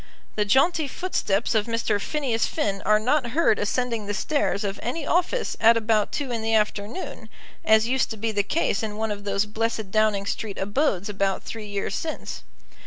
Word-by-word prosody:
The 210 - 0
jaunty 290 - +3
footsteps 235 - -1
of 220 -1 +1
Mr. 225 -3 0
Phineas 260 -6 0
Finn 200 -11 -1
are 215 0 +5
not 255 +3 +1
heard 315 -10 +3
ascending 230 -1 -1
the 205 - -2
stairs 255 -6 0
of 200 -1 -3
any 265 +7 -3
office 360 +10 0
at 230 +1 +7
about 220 -2 +1
two 280 -4 -3
in 230 -2 -2
the 225 0 +1
afternoon, 215 - -2 0.3
as 220 +1 +4
used 260 0 +1
to 220 - -5
be 220 +1 -1
the 205 -1 +2
case 205 0 0
in 215 -2 -4
one 220 0 -1
of 205 0 -5
those 200 +1 +1
blessed 220 -1 -2
Downing 215 -2 +2
Street 200 0 -3
abodes 205 - 0
about 195 -2 -1
three 220 -2 -7
years 200 -1 -3
since. 315 -1 -4
220 Hz, 185 wpm, -25 LUFS, 205-250 Hz, 0.3 s, at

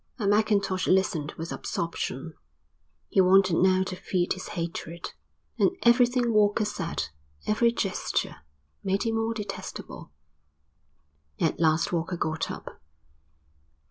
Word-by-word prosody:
And 205 -5 +1
Mackintosh 200 -3 +2
listened 175 -6 +1
with 165 +1 -5
absorption. 165 -2 -3 0.8
He 195 - +4
wanted 185 -2 +5
now 185 0 +4
to 185 - -5
feed 180 -1 0
his 185 - -8
hatred; 170 0 -5 0.5
and 370 - +3
everything 240 0 +4
Walker 210 0 +3
said, 170 - -3 0.4
every 235 +2 +3
gesture, 195 -5 -2 0.5
made 195 0 0
him 225 - 0
more 225 0 0
detestable. 205 - -7 1.3
At 160 - +1
last 160 +1 +2
Walker 170 +1 -1
got 160 0 -2
up. - - -8
190 Hz, 115 wpm, -27 LUFS, 170-215 Hz, 1.3 s, wanted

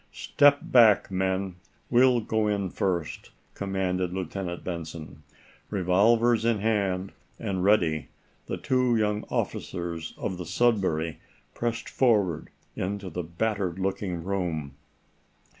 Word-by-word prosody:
"Step 145 0 +3
back, 115 -6 +5
men! 95 0 -1 0.3
We'll 125 0 +5
go 110 0 0
in 100 -3 -1
first," 85 -5 -2 0.2
commanded 95 -2 -1
Lieutenant 90 -1 -4
Benson. 80 -4 -6 0.5
Revolvers 110 +5 +3
in 115 -1 +2
hand, 100 -3 0 0.3
and 95 -4 -2
ready, 85 -7 +2 0.4
the - - -3
two 125 -2 +1
young 105 -1 0
officers 85 -2 -3
of 95 - -4
the 90 - -5
"Sudbury" 95 -9 +1 0.3
pressed 115 -1 -3
forward 100 - +1 0.3
into 100 0 -3
the 90 - -3
battered 95 +1 -2
looking 95 -2 -2
room. 85 -7 -2
95 Hz, 110 wpm, -27 LUFS, 90-110 Hz, 0.5 s, back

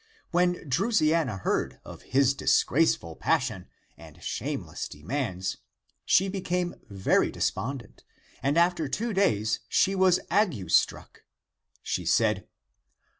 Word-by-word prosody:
When 175 -1 +1
Drusiana 160 - +1
heard - - -1
of - - -10
his 135 +1 +2
disgraceful 135 - +2
passion 130 - 0 0.3
and 80 -1 -14
shameless - - -4
demands, 95 - -3 0.5
she 190 +3 +4
became 180 -2 -2 0.2
very 95 -2 +2
despondent, 130 -3 -4 0.4
and 140 +4 +1
after 170 -2 +2
two 225 - -2
days 110 - +1
she 195 - +3
was 185 -1 +4
ague 170 - +1
struck. - - +1 0.6
She - - -2
said. - - +2
145 Hz, 110 wpm, -27 LUFS, 110-180 Hz, 0.6 s, she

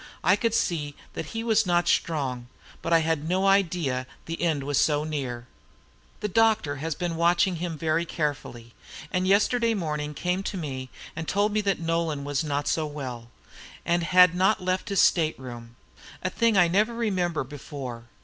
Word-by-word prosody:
I - - +5
could 230 -2 0
see 150 -4 -1 0.2
that 155 - -5
he 225 +4 -4
was 220 -3 +2
not 175 0 +2
strong, 130 -9 0 0.3
but 165 - -3
I 165 -1 +5
had 160 -1 -1
no 190 +2 +1
idea 170 -10 +1 0.2
the 165 0 -5
end 160 -5 +1
was 145 0 +1
so 150 -1 +2
near. 130 -6 -4 0.8
The 210 - 0
doctor 215 -8 +2
has 155 +2 -3
been 175 -2 -3
watching 175 +2 +3
him 170 -1 -4
very 160 +1 +1
carefully, 145 -8 -4 0.4
and 185 0 0
yesterday 225 +4 +3
morning 150 -5 -3
came 180 +5 -1
to 195 - -4
me 130 -6 -5 0.3
and 165 0 -5
told 205 +2 +1
me 215 - +2
that 200 -2 0
Nolan 165 -3 -1
was 145 +1 -1
not 145 -1 -2
so 155 -1 0
well, 130 -6 -7 0.6
and 170 +1 +2
had 180 0 +6
not 190 +4 +3
left 185 +1 -2
his 200 - +3
state 160 -3 +3
room, 120 -2 -9 0.5
a 185 - -1
thing 230 -3 +2
I 180 -2 +6
never 210 +7 +1
remember 185 -9 0
before. 130 -3 -8
165 Hz, 180 wpm, -26 LUFS, 145-185 Hz, 0.8 s, had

